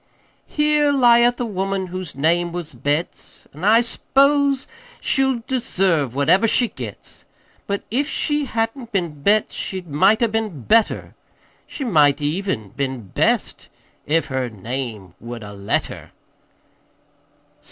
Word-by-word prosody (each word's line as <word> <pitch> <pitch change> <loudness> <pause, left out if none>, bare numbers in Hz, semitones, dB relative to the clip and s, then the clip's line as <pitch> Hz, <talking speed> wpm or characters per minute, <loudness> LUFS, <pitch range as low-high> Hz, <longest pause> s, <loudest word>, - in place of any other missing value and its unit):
"Here 300 -1 +2
lieth 240 -2 +4
a 245 - -1
woman 195 -2 -2
whose 185 -2 -6
name 170 +5 +1
was 170 -3 -6
Betts, 145 +7 -3
An' 155 +5 -11
I 220 +4 +5
s'pose 275 +3 +2 0.3
she'll 265 -4 +1
deserve 185 - 0
whatever 185 +10 +3
she 240 +1 +3
gets; - - -9 0.4
But 200 0 -2
if 280 +6 0
she 295 -1 0
hadn't 230 0 -3
been 170 -8 -2
Betts 210 +6 +2
she 190 -1 -4
might 190 +9 +3
'a' - - +4
been 215 - -3
Better, 225 - +2 0.5
She 285 - -6
might 150 - +3
even 150 - -2
been 130 -4 -4
Best - - 0 0.4
if 160 +2 +2
her 130 -2 -2
name 110 -3 -6
would 115 -1 -8
'a' 105 0 -9
let 100 0 -1
her." - - -10
190 Hz, 130 wpm, -21 LUFS, 140-235 Hz, 0.5 s, I